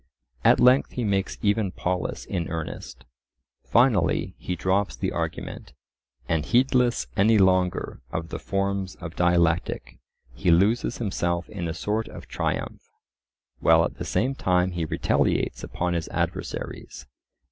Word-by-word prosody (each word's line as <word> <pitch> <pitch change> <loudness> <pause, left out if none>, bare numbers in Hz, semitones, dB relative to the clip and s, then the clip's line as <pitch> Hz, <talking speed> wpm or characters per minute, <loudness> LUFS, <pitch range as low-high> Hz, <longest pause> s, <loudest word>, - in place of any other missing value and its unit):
At - - +5
length 125 +2 +5
he 125 - -2
makes 100 -3 0
even 105 -2 +2
Polus 90 0 -3
in 85 -2 -3
earnest. 80 -1 -6 0.6
Finally, 120 -6 +2
he 90 - -3
drops 95 -4 0
the - - -2
argument, 65 - -5 0.5
and 80 -2 +1
heedless 125 - +2
any 110 +3 +4
longer 95 -2 +2
of 80 +1 -4
the 85 - -5
forms 100 0 -2
of 85 0 -8
dialectic, 85 -1 +1 0.3
he 75 - -1
loses 100 +8 +3
himself 85 -5 -1
in 90 -5 -4
a 80 - -3
sort 110 +5 -1
of - - -10
triumph, - - -3 0.8
while - - +5
at - - -5
the - - -3
same 130 +4 0
time 90 -7 +1
he 85 -2 -2
retaliates - - 0
upon 90 0 -2
his 85 -2 -2
adversaries. 65 - -4
95 Hz, 135 wpm, -25 LUFS, 85-105 Hz, 0.8 s, At